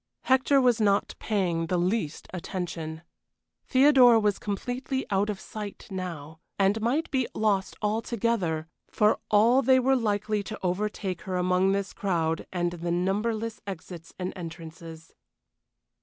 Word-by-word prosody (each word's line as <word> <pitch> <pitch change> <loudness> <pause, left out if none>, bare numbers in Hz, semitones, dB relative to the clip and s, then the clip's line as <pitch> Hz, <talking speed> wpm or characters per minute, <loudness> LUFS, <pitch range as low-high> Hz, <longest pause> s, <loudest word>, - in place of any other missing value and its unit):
Hector 265 +2 +4
was 245 -3 +3
not 200 -1 +2
paying 175 -6 0
the 180 - 0
least 175 -3 -1
attention. 165 -3 -5 0.6
Theodora 255 -3 +6
was 210 -2 +1
completely 250 +6 -3
out 200 +2 +2
of 205 -2 -3
sight 210 -1 -8
now, 165 -5 -6 0.2
and 200 +3 +2
might 265 +9 0
be 260 -3 +1
lost 200 -3 0
altogether, 210 -7 -1 0.2
for 210 0 +2
all 230 +5 +5
they 260 0 +5
were 265 +1 +3
likely 215 -3 0
to 215 +2 -7
overtake 185 0 -2
her 185 - -1
among 180 +1 +2
this 200 -1 -2
crowd 165 -4 -1
and 175 -1 -1
the 175 0 -5
numberless 215 +6 -1
exits 170 -2 -8
and 180 0 -4
entrances. 165 -1 -9
200 Hz, 135 wpm, -27 LUFS, 175-225 Hz, 0.6 s, Theodora